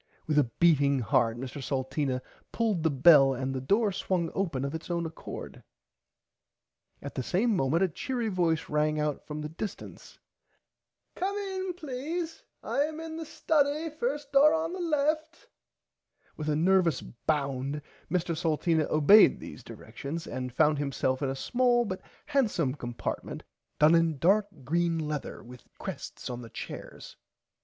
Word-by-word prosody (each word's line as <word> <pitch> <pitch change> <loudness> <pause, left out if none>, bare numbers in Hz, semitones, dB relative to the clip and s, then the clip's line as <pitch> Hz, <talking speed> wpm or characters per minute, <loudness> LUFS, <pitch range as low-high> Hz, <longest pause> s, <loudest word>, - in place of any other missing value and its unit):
With 150 -1 +3
a 145 - +4
beating 145 -5 +4
heart 115 0 +2
Mr 130 +3 -6
Salteena 130 0 -2 0.3
pulled 220 -7 0
the 160 - +2
bell 135 -1 +6
and 130 +1 -2
the 130 - -3
door 205 - +2
swung 180 -3 -1
open 160 -9 -1
of 140 - -4
its 160 +2 -6
own 170 -1 -1
accord. 160 0 -8 1.4
At - - -6
the - - -2
same 210 - +1
moment 160 +3 +2
a - - +4
cheery 240 - -3
voice 175 -6 0
rang 150 0 +1
out 150 -1 -2
from 150 0 -5
the 150 - -4
distance. 195 +6 -8 1.0
Come 390 +3 -2
in 380 -2 -3
please 320 +2 -4 0.2
I - - -2
am 310 +2 -1
in 325 -1 -6
the 325 -1 -6
study 305 +1 +1
first 290 0 -3
door 285 +2 +6
on 325 +2 -2 0.2
left. 310 +2 0 0.9
With 155 0 -4
a 150 - +2
nervous 170 -2 +3
bound 140 +1 -2 0.3
Mr 175 0 0
Salteena 160 -1 +1
obeyd 155 +8 +7
these - - -9
directions 140 +9 -7
and 125 -1 -4
found 150 +3 +3
himself 130 -1 -1
in 140 - 0
a 135 - -2
small 240 - +2
but 185 -3 -4 0.2
handsome 200 - +1
compartment 120 -4 -5 0.3
done 150 +2 +6
in 165 -2 +3
dark 200 +7 +3 0.2
green 170 +4 +1
lether 150 -2 -4
with 125 +1 -12
crests - - -7
on 125 0 -5
the 115 - -10
chairs. - - -8
165 Hz, 150 wpm, -29 LUFS, -, 1.4 s, obeyd